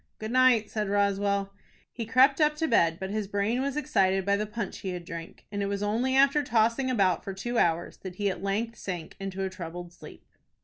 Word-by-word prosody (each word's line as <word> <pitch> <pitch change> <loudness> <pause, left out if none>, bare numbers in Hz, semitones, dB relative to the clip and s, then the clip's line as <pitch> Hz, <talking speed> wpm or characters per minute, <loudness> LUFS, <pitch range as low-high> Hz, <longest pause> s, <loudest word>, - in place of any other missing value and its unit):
"Good 215 +1 -5
night," 255 -4 +4
said 210 -2 -2
Roswell. 200 0 +1 0.4
He 230 -3 -5
crept 270 +5 +4
up 300 0 +4
to 320 +1 -1
bed, 165 - +3
but 190 +1 -4
his 215 -1 -2
brain 205 +5 0
was 280 +1 -2
excited 195 -10 +1
by 200 0 +3
the 210 +1 -2
punch 210 -1 -5
he 190 -2 -4
had 175 -1 -6
drank, 165 0 -9
and 205 -1 -3
it 200 - 0
was 200 0 -2
only 235 +6 0
after 275 +2 +5
tossing 235 +1 +1
about 195 -8 +2
for 195 - -6
two 240 +5 -2
hours 170 0 +1
that 185 -2 -8
he 205 +1 -1
at 190 - -2
length 215 +4 -2
sank 175 -4 -6
into 195 0 -4
a 190 - -1
troubled 175 -1 -7
sleep. - - -13
205 Hz, 220 wpm, -28 LUFS, 190-235 Hz, 0.4 s, after